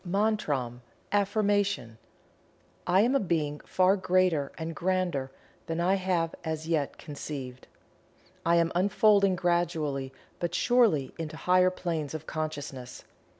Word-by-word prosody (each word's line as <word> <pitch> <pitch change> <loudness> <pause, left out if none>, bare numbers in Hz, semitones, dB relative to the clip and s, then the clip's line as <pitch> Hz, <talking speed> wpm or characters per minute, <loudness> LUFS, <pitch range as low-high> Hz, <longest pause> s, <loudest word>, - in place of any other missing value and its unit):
MANTRAM 175 - -1 0.3
(AFFIRMATION.) 200 - +1 0.9
I 185 +2 +5
Am 240 +5 +3
a 275 - +4
Being 155 - -1
far 185 +1 +2
greater 185 -6 +1
and 160 0 -5
grander 175 -7 -1 0.4
than 165 0 -2
I 180 +2 +3
have 180 -4 0
as 160 -1 -4
yet 155 -4 -1
conceived. 140 -4 -7 0.8
I 170 +1 +3
am 170 -1 +3
unfolding 200 +1 +4
gradually 165 -6 0 0.3
but 175 0 -2
surely 225 - +3
into 160 -1 -5
higher 185 +1 +4
planes 165 -5 -3
of 155 0 -6
consciousness. 145 -6 -5
170 Hz, 120 wpm, -28 LUFS, 150-185 Hz, 0.9 s, I